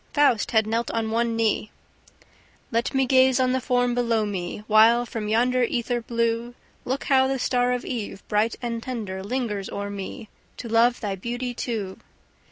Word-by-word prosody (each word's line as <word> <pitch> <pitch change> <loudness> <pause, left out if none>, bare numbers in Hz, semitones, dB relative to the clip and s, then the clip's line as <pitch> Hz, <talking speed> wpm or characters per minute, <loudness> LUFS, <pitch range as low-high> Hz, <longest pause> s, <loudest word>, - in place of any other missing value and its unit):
Faust 280 -7 +3
had 220 -2 +3
knelt 230 +2 -1
on 225 -1 -2
one 230 0 0
knee: 220 -1 0 1.0
"Let 235 +4 -1
me 265 0 +3
gaze 260 0 +4
on 255 -1 +2
the 260 0 0
form 245 -1 +1
below 230 -3 +1
me, 190 0 -4
While 225 +3 +5
from 220 -2 -5
yonder 245 +4 +2
ether 240 0 0
blue 235 +1 -1 0.3
Look 260 +2 -2
how 265 -1 +4
the 270 0 -1
star 250 0 +1
of 250 0 -2
eve, 220 -5 -5
bright 215 +2 +1
and 230 -1 -3
tender, 215 -7 -5
lingers 210 -3 -3
o'er 200 0 -4
me, 200 +4 -7 0.3
To 235 - -6
love 230 +2 +3
thy 205 -3 -2
beauty 245 +5 -4
too!" 215 -6 -4
235 Hz, 175 wpm, -24 LUFS, 220-250 Hz, 1.0 s, While